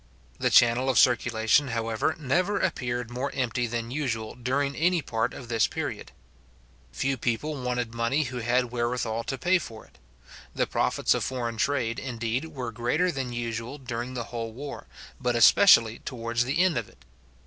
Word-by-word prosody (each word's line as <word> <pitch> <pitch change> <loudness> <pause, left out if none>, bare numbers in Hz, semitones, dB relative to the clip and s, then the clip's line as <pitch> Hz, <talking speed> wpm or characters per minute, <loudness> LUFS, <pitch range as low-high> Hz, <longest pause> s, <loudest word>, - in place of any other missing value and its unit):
The - - +2
channel 120 +2 +5
of 130 - +1
circulation, 120 +2 +3
however, 115 +4 -1
never 175 +8 0
appeared 120 -1 -2
more 130 +3 -3
empty 125 -2 -1
than 115 0 -4
usual 115 -6 -2
during 140 +3 -1
any 175 0 +2
part 115 -3 -1
of 125 - -9
this 115 -2 +2
period. - - -5 0.8
Few 135 - -1
people 130 +5 -2
wanted 125 -2 -2
money 115 +6 +1
who 125 -2 -5
had 120 +1 +1
wherewithal 120 -1 -1
to 135 - -3
pay 180 +7 +3
for 110 -8 -9
it. - - -25 0.6
The - - +1
profits - - +1
of - - -1
foreign 120 -3 -3
trade, 120 -2 0
indeed, 120 +1 -3
were 130 -7 -5
greater 125 +11 0
than 135 -4 -4
usual 120 +2 -4
during 125 -1 -5
the 120 - -2
whole 115 -1 -3
war, 140 +4 -8 0.3
but 125 -2 0
especially 115 - +6
towards 120 -1 -2
the 140 +8 +2
end 185 -7 +2
of 115 - -8
it. - - -23
125 Hz, 170 wpm, -27 LUFS, 115-135 Hz, 0.8 s, especially